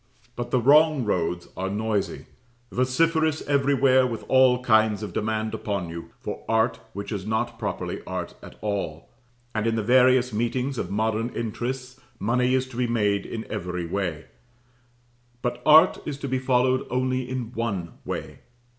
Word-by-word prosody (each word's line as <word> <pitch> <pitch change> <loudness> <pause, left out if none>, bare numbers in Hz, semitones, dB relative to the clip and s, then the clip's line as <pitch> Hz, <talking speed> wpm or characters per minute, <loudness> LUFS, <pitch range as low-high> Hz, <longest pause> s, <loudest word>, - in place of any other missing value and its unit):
But 120 0 -4
the 130 - +2
wrong 145 +1 +5
roads 85 -3 -1
are 95 +1 -2
noisy, 105 0 -2 0.5
vociferous 160 +5 +1
everywhere 135 -2 +3
with 115 -2 -5
all 130 -1 +4
kinds 110 -3 +3
of 100 -4 -6
demand 110 0 -1
upon 100 -5 -3
you 85 0 -7
for - - -6
art 110 +2 +2
which 100 +2 -6
is 100 -3 -3
not 115 +1 -1
properly 105 -3 -3
art - - -4
at - - -12
all; 95 -7 -3 0.4
and 110 +1 0
in 115 - +1
the 110 - -1
various 125 +1 +4
meetings 125 +4 -1
of 90 - -3
modern 110 +3 0
interests, 125 +3 -4 0.2
money 125 +4 +1
is 130 0 0
to 120 - -10
be 125 -1 +1
made 105 -4 +1
in 115 -1 -5
every 90 -4 -4
way; 85 -3 -3 1.2
but 120 - -2
art 160 +4 +7
is 145 -2 -4
to 140 - -5
be 130 0 0
followed 130 0 +2
only 130 0 -1
in 125 -3 -4
one 100 -8 -3
way. - - -5
120 Hz, 160 wpm, -25 LUFS, 105-130 Hz, 1.2 s, art